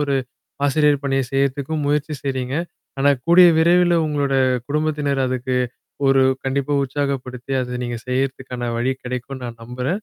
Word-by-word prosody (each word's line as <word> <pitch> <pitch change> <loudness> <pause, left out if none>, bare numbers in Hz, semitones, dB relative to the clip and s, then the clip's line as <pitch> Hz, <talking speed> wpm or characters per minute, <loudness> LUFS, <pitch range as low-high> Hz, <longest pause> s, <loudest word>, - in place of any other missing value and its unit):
ஒரு 140 -1 0 0.5
ஆசிரியர் 145 0 +3
பணிய 135 0 +1
செய்றதுக்கும் 140 +2 0
முயற்சி 150 +1 0
செய்றீங்க. 130 -1 -2 0.4
ஆனா 140 +1 +4 0.2
கூடிய 175 +1 +8
விரைவில 175 +1 +4
உங்களோட 145 -2 0 0.3
குடும்பத்தினர் 150 -2 0
அதுக்கு 130 0 -2 0.5
ஒரு 135 0 +5 0.2
கண்டிப்பா 140 +2 -1
உற்சாகப்படுத்தி, 135 -2 -3
அத 125 0 -4
நீங்க 120 -1 -4
செய்றதுக்கான 125 -2 -2
வழி 130 +3 +1
கிடைக்கும்ன்னு 125 +1 -5
நான் 115 -1 -9
நம்புறேன். 125 - -3
135 Hz, 130 wpm, -21 LUFS, 125-145 Hz, 0.5 s, கூடிய